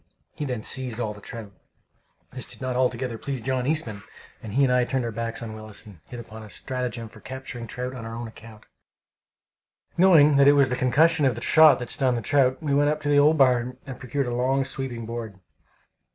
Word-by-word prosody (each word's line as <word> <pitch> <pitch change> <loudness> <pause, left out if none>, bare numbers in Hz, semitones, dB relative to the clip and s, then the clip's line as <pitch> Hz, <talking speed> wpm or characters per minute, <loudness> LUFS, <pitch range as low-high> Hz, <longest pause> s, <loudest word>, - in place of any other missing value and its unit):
He 150 - -4
then 125 -5 -4
seized 125 -3 -1
all 110 -3 -2
the 105 - -14
trout. 110 -1 -9 0.8
This 130 -1 -5
did - - -5
not 130 -1 -3
altogether 125 -2 -1
please 140 -2 -4
John 130 +2 -2
Eastman, 120 -10 -2 0.4
and 105 -2 -8
he 140 +4 +3
and 130 -2 +3
I 125 0 +3
turned 130 0 -1
our 115 - -3
backs 115 +1 -4
on 110 -1 -6
Willis, 110 -1 -9
and 100 -6 -14
hit 125 - -9
upon 110 -1 -10
a 110 - -11
stratagem 125 -1 -4
for 110 - -15
capturing 130 -3 -8
trout 125 +3 -5
on 125 -3 -7
our 115 0 -6
own 120 0 -5
account. 110 -1 -14 1.3
Knowing 160 -6 +6
that 140 0 +6
it 145 - +8
was 140 -2 +4
the 125 - 0
concussion 150 +6 +3
of 125 - 0
the 120 - -7
shot 155 -2 +6
that 125 - -6
stunned 130 -4 +1
the - - -3
trout, 130 +2 +2
we 145 -2 0
went 145 +1 +3
up 150 0 -1
to 145 - -2
the 145 0 +5
old 150 +2 +4
barn 125 -2 +2
and 135 -3 -8
procured 135 +2 -2
a 120 - -3
long, 130 +2 +1
sweeping 130 -3 -5
board. 115 -4 -6
125 Hz, 225 wpm, -25 LUFS, 115-135 Hz, 1.3 s, it